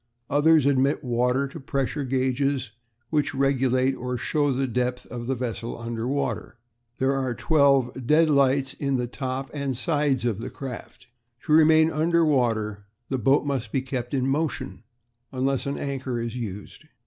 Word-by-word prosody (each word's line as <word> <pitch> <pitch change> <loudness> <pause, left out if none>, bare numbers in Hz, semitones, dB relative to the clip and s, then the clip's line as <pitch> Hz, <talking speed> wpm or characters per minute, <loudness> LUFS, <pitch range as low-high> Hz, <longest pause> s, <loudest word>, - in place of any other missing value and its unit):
Others 150 0 +4
admit 140 +2 +2
water 125 +2 +1
to 140 - -9
pressure 140 +1 -2
gauges, 130 -1 0 0.4
which 150 -1 0
regulate 135 -1 +2
or 125 -1 -4
show 145 +3 0
the 135 +1 0
depth 125 0 -2
of 120 -1 -5
the 135 - 0
vessel 120 -1 -4
under 115 0 -4
water. 140 -2 -2 0.4
There 130 +1 +1
are 130 -3 -1
twelve 135 -5 +2
deadlights 140 -3 +3
in 140 -1 -1
the 125 - -1
top 130 +2 -4
and 140 -4 -2
sides 145 -4 +1
of 110 -4 0
the 125 +3 -5
craft. 130 -2 -8 0.4
To 150 - +1
remain 160 0 +6
under 165 +2 +2
water 110 -8 0 0.2
the 130 - -1
boat 135 +6 +3
must 130 -6 -2
be 135 - 0
kept 130 -1 -3
in 130 -1 0
motion, 135 -1 -2 0.5
unless 135 +1 -1
an 140 - -2
anchor 130 -3 -3
is 115 0 -4
used. 105 +4 -7
135 Hz, 160 wpm, -25 LUFS, 125-140 Hz, 0.5 s, remain